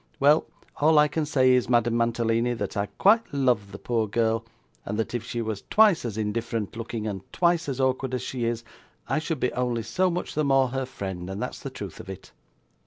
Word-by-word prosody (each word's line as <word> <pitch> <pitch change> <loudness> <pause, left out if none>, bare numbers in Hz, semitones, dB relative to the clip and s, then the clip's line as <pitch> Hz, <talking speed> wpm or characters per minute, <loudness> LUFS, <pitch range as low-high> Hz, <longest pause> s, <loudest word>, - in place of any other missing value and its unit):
Well, 145 +3 +4 0.3
all 155 +1 +4
I 150 0 +6
can 150 +1 -2
say 130 -3 +4
is, 125 -2 +3
Madame 120 -1 +3
Mantalini, 115 0 +1
that 115 - -4
I 100 0 0
quite 220 - +3
love 125 -8 +1
the 100 - -7
poor 115 0 -1
girl; 115 +1 +1 0.4
and 105 - -4
that 110 - -2
if 120 -2 -2
she 120 0 -3
was 110 -3 -4
twice 210 - +5
as 110 -3 -4
indifferent 110 0 -2
looking, 115 -1 -4
and 100 -3 -3
twice 170 -3 +2
as 135 -1 -3
awkward 130 0 0
as 125 - -3
she 125 -3 -3
is, 115 0 -2 0.4
I - - +1
should 160 -2 -3
be 125 - 0
only 125 -2 -1
so 180 +12 +1
much 175 0 -3
the 155 - 0
more 135 -2 +3
her 135 0 -3
friend, 95 -7 -6
and 95 +1 -5
that's - - -4
the - - -6
truth - - -8
of - - -10
it. 95 - -9
120 Hz, 220 wpm, -26 LUFS, 110-140 Hz, 0.4 s, I